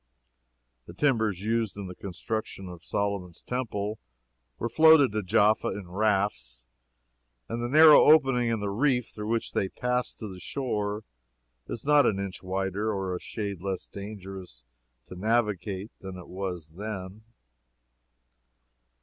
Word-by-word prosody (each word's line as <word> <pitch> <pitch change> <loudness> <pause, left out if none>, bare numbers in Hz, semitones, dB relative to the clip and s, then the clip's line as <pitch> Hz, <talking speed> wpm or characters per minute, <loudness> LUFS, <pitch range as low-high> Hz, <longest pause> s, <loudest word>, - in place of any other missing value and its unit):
The 85 - -11
timbers 110 -8 +1
used 110 -2 0
in 100 - -5
the 90 - -7
construction 95 +1 -5
of 90 -1 -10
Solomon's 100 -4 -3
Temple 110 -4 -3 0.6
were 115 - -2
floated 155 +1 +6
to 110 +1 -1
Jaffa 105 +2 +3
in 95 -3 -5
rafts, 95 - 0 0.8
and 115 - -3
the 120 - -2
narrow 155 +2 +8
opening 135 -6 +5
in 115 -2 -1
the 100 -1 -2
reef 125 +2 +1
through 105 0 -7
which 115 0 -1
they 95 - 0
passed 125 +3 -2
to 110 - -6
the 95 -2 -9
shore 105 -2 -2 0.6
is 115 - -6
not 150 0 +5
an 100 - +1
inch 100 -2 -5
wider 95 +3 -1
or 95 -3 -2
a - - -4
shade 100 -4 -5
less 95 -1 -3
dangerous 95 - -8 0.4
to - - -9
navigate 105 -1 -1
than 95 -1 -8
it 90 - -10
was 90 -4 -5
then. 100 -1 -6
105 Hz, 140 wpm, -28 LUFS, 95-115 Hz, 0.8 s, narrow